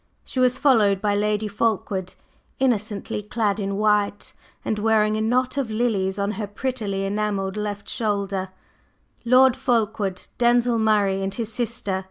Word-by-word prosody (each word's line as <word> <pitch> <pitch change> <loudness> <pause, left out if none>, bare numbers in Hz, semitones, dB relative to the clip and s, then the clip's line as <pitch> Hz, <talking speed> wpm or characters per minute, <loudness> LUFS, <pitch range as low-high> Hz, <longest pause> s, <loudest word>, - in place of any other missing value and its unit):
She 260 - -4
was 255 0 +3
followed 220 -9 +4
by 205 0 0
Lady 210 +1 0
Fulkeward, 200 -3 -1 0.4
innocently 215 -5 -1
clad 210 0 -1
in 195 -1 -2
white 210 -1 +1 0.3
and 215 - -1
wearing 215 0 +2
a 215 - -1
knot 250 +4 +1
of 270 -5 -1
lilies 215 -4 0
on 200 0 0
her 215 -1 -4
prettily 205 -3 -3
enamelled 200 -1 -1
left 210 -1 -4
shoulder, 200 -3 -2 0.8
Lord 255 +1 +5
Fulkeward, 220 -7 -1
Denzil 240 -1 +3
Murray 205 -3 +2
and 195 0 -3
his 225 -2 -4
sister. 225 -5 -2
210 Hz, 145 wpm, -23 LUFS, 200-230 Hz, 0.8 s, Lord